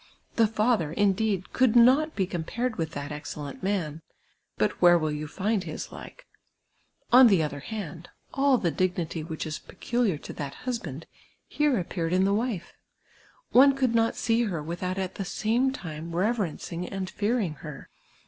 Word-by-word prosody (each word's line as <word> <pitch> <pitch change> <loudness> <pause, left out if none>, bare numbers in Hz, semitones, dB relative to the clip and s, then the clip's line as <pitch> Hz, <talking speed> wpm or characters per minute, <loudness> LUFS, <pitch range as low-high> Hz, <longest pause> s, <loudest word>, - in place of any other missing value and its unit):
The 225 -1 +4
father, 215 -7 +1
indeed, 200 +1 0
could 255 -3 +3
not 265 +7 +5
be 190 - +1
com])ared 215 +8 -3
with 165 -3 -3
that 145 +1 -5
excellent 150 -1 -7
man; 175 -6 -2 0.6
but - - 0
where 175 0 +7
will 155 -2 -1
you 150 0 -4
find 200 +5 -1
his - - -6
like? - - -11 0.9
On 255 0 +10
the 190 -7 +4
other 145 -1 -3
hand, 175 -1 -7 0.2
all 275 -1 +4
the 175 -7 0
dii? 185 +1 +1
nity 165 -2 -3
which 160 0 -5
is 155 -1 -4
peculiar 225 -2 -1
to - - -9
that 140 -2 -6
husband, 170 - -4 0.4
here 295 -3 +1
appeared 170 -1 -2
in 185 +1 +3
the 200 - +2
wife. 210 -5 -2 0.8
One 275 +2 +7
could 260 -3 +1
not 230 0 +2
see 230 +1 +1
her 170 -8 -3
without 180 +3 -3
at 190 -1 -2
the - - 0
same 230 +7 +1
time 165 -8 -7
rcyer 205 +2 +1
cncing 175 +1 -6
and 190 -1 -5
fearini^ 205 - 0
her. 150 -2 -9
190 Hz, 170 wpm, -27 LUFS, 165-230 Hz, 0.9 s, On